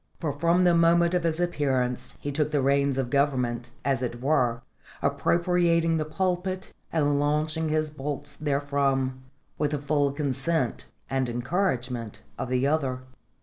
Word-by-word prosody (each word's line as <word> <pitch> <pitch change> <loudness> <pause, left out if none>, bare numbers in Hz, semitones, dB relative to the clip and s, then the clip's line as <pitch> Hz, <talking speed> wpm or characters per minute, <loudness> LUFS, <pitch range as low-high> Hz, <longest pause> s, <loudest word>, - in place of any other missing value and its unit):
For 155 -4 -2
from 170 +5 +2
the 175 -1 +5
moment 170 +1 +4
of 180 - +2
his 165 0 0
appearance 130 -7 -1
he 145 - -4
took 150 +1 0
the 145 -3 +1
reins 140 0 +2
of 130 -2 -1
government, 125 -4 +1 0.2
as 135 -3 +1
it 120 -1 -3
were, 125 -4 +1 0.4
appropriating 170 -1 +2
the 155 - -1
pulpit 185 +3 -2 0.2
and 145 -3 +2
launching 155 +2 +1
his 155 0 0
bolts 145 -1 -5
therefrom, 140 -3 0 0.4
with 150 -1 +2
the 150 - -1
full 145 0 +1
consent 140 -1 -1 0.2
and 130 -2 0
encouragement 125 - -2 0.2
of - - -3
the 130 +1 +1
other. 135 -4 0
145 Hz, 145 wpm, -26 LUFS, 130-160 Hz, 0.4 s, the